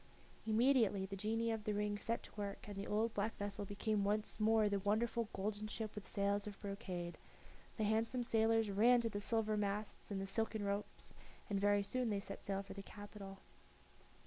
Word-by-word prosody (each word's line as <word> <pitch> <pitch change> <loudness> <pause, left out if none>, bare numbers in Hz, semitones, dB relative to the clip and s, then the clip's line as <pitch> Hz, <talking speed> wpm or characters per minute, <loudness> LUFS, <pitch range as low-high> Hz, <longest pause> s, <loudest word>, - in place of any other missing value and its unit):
Immediately 220 -4 +4
the 195 +1 -5
genii 225 +3 0
of 220 -1 -2
the 210 0 0
ring 205 0 0
set 230 +3 -2
to - - -11
work, 200 -1 -4
and 205 - -6
the 195 +1 -4
old 220 +2 +1
black 210 +2 -1
vessel 205 0 -3
became 205 +1 0
once 210 +2 0
more 220 0 +5
the 200 -1 +1
wonderful 220 +3 +1
golden 205 +2 -2
ship 215 0 -4
with 210 -3 -7
sails 200 +1 +1
of 205 -2 -7
brocade; 185 -4 -4 0.6
the 220 - +1
handsome 225 +4 +1
sailors 225 -2 +3
ran 235 +5 +6
to 230 - 0
the 205 - -3
silver 215 0 +1
masts 205 0 -2
and 200 -2 -2
the 195 - -2
silken 220 +1 -1
ropes, 200 +1 -3 0.4
and 200 - +2
very 205 0 +4
soon 245 +4 0
they 205 -2 +1
set 200 0 -6
sail 195 0 -2
for 195 - -8
the 195 - -6
capital. 200 -1 -9
210 Hz, 195 wpm, -39 LUFS, 200-220 Hz, 0.6 s, ran